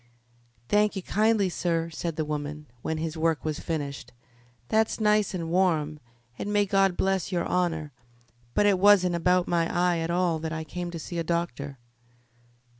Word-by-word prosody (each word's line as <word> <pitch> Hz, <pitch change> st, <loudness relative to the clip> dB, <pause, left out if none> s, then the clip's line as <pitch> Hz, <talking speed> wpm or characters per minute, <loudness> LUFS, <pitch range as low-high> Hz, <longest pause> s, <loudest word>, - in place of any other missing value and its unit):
"Thank 210 Hz, 0 st, +2 dB
ye 195 Hz, -, -4 dB
kindly, 215 Hz, 0 st, +2 dB
sir," 165 Hz, -2 st, -1 dB
said 165 Hz, +1 st, -4 dB
the 155 Hz, -, -1 dB
woman, 150 Hz, 0 st, -4 dB, 0.2 s
when 160 Hz, -, -2 dB
his 160 Hz, 0 st, -3 dB
work 160 Hz, -1 st, 0 dB
was 155 Hz, -1 st, -2 dB
finished; 145 Hz, -6 st, -4 dB, 0.5 s
"that's 220 Hz, +1 st, +1 dB
nice 210 Hz, -2 st, +2 dB
and 165 Hz, -2 st, -4 dB
warm, 160 Hz, -5 st, +1 dB, 0.4 s
and 205 Hz, -, -3 dB
may 205 Hz, 0 st, +3 dB
God 195 Hz, -2 st, +2 dB
bless 190 Hz, -1 st, 0 dB
your 175 Hz, -2 st, 0 dB
honour. 165 Hz, -4 st, -1 dB, 0.6 s
But 205 Hz, -, +4 dB
it 200 Hz, -3 st, +4 dB
wasn't 190 Hz, -2 st, +5 dB
about 180 Hz, +1 st, +2 dB
my 170 Hz, -1 st, +1 dB
eye 175 Hz, -1 st, +2 dB
at 165 Hz, 0 st, -2 dB
all 175 Hz, -2 st, +1 dB
that 160 Hz, 0 st, -4 dB
I 160 Hz, 0 st, -3 dB
came 175 Hz, +3 st, -5 dB
to 170 Hz, -, -6 dB
see 170 Hz, +2 st, -5 dB
a -, -, 0 dB
doctor." 165 Hz, -4 st, -3 dB
175 Hz, 175 wpm, -27 LUFS, 160-190 Hz, 0.6 s, wasn't